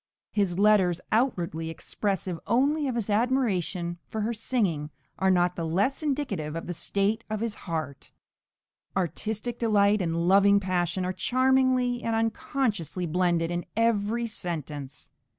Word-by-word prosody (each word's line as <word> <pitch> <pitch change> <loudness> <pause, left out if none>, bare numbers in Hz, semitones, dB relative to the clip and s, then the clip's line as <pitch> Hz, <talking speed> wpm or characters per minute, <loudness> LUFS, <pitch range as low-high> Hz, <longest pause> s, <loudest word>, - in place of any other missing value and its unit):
His 195 -4 0
letters, 195 -4 +4
outwardly 180 -9 0
expressive 185 +1 -3
only 285 +5 +2
of 255 - -2
his 220 -3 -1
admiration 205 -7 0
for 220 - -4
her 225 +3 0
singing, 200 - -1 0.3
are 190 +1 +3
not 180 -1 +3
the 170 - -3
less 195 - 0
indicative 255 - -2
of 165 - -4
the 175 - -4
state 200 +6 0
of 215 -1 -2
his 230 -1 -2
heart; 155 -8 -5 0.9
artistic 215 +6 -2
delight 210 -2 +3
and 170 0 0
loving 200 +1 +6
passion 180 -1 -1
are 185 - -1
charmingly 255 0 +2
and 230 -1 -1
unconsciously 225 - -1
blended 170 0 +1
in 175 0 -2
every 230 0 +1
sentence. 155 - -6
200 Hz, 135 wpm, -27 LUFS, 175-230 Hz, 0.9 s, loving